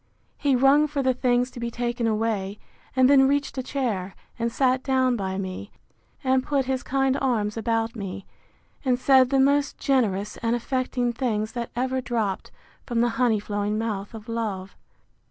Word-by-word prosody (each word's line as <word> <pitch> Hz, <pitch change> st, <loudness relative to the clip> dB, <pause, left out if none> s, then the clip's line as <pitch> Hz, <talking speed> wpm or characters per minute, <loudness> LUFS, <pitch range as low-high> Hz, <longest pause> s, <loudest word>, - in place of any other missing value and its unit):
He 280 Hz, -2 st, +2 dB
rung 275 Hz, +4 st, +5 dB
for 285 Hz, -2 st, -2 dB
the 260 Hz, 0 st, +3 dB
things 250 Hz, 0 st, +1 dB
to -, -, -9 dB
be 235 Hz, 0 st, -2 dB
taken 240 Hz, 0 st, -2 dB
away; 215 Hz, -3 st, -1 dB, 0.4 s
and 260 Hz, -1 st, +5 dB
then 270 Hz, -1 st, +6 dB
reached 285 Hz, 0 st, 0 dB
a -, -, 0 dB
chair, 225 Hz, -9 st, -3 dB, 0.2 s
and 235 Hz, 0 st, 0 dB
sat 255 Hz, +1 st, +2 dB
down 260 Hz, -2 st, +2 dB
by 190 Hz, -3 st, -3 dB
me, 190 Hz, +1 st, -5 dB, 0.5 s
and 260 Hz, -1 st, +2 dB
put 275 Hz, -2 st, 0 dB
his 260 Hz, -1 st, -1 dB
kind 270 Hz, 0 st, +1 dB
arms 220 Hz, -6 st, 0 dB
about 225 Hz, +1 st, -1 dB
me, 195 Hz, -2 st, -6 dB, 0.6 s
and 255 Hz, -3 st, +2 dB
said 260 Hz, 0 st, +5 dB
the 270 Hz, 0 st, +2 dB
most 280 Hz, +1 st, +2 dB
generous 210 Hz, -7 st, 0 dB
and 230 Hz, 0 st, 0 dB
affecting 250 Hz, 0 st, -1 dB
things 220 Hz, -4 st, -1 dB
that 235 Hz, 0 st, -4 dB
ever 260 Hz, +1 st, -1 dB
dropt 220 Hz, -6 st, -2 dB, 0.3 s
from 240 Hz, -2 st, -2 dB
the 240 Hz, -, +3 dB
honey 230 Hz, -2 st, +2 dB
flowing 205 Hz, 0 st, -2 dB
mouth 215 Hz, -1 st, -3 dB
of 220 Hz, 0 st, -10 dB
love. 210 Hz, -5 st, -4 dB
240 Hz, 170 wpm, -25 LUFS, 215-260 Hz, 0.6 s, then